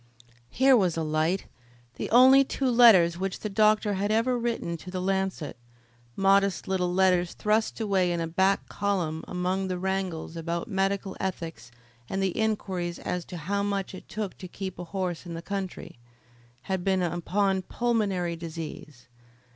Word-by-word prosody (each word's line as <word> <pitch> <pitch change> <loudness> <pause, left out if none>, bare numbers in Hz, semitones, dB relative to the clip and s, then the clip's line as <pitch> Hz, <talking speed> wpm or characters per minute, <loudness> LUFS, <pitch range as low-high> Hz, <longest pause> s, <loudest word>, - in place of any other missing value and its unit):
Here 265 +1 +5
was 185 -7 +2
a 165 - 0
light! 155 +4 0 0.5
The - - -4
only 260 +3 +7
two 265 -1 -1
letters 190 -8 +6
which 195 0 -3
the 215 - -4
doctor 215 0 +3
had 200 +2 -1
ever 230 +3 +2
written 235 -8 -2
to 180 - -11
The 185 0 -4
Lancet 190 -5 -2 0.6
modest 195 -1 +2
little 185 -2 0
letters 180 -1 +2
thrust 215 +2 0
away 195 -5 +1
in 170 - -1
a 165 - -1
back 190 +4 +1
column 175 -6 -2
among 185 +1 -1
the 185 -1 -2
wrangles 185 -3 -3
about 170 +5 -3
medical 195 -1 -1
ethics 165 -10 -5 0.4
and 190 - -2
the 195 -1 +1
inquiries 190 -6 -1
as 180 -1 -3
to 180 - -8
how 200 +5 -2
much 200 -1 -2
it 185 - -11
took 210 -3 -4
to 185 - -7
keep 190 0 -7
a 175 - -5
horse 180 -1 -4
in 170 - -6
the 165 - -5
country 195 -10 -5 0.6
had 190 -2 -2
been 190 -1 +1
upon 190 +3 0
pulmonary 200 -6 -1
disease. 155 -5 -8
190 Hz, 165 wpm, -27 LUFS, 175-200 Hz, 0.6 s, only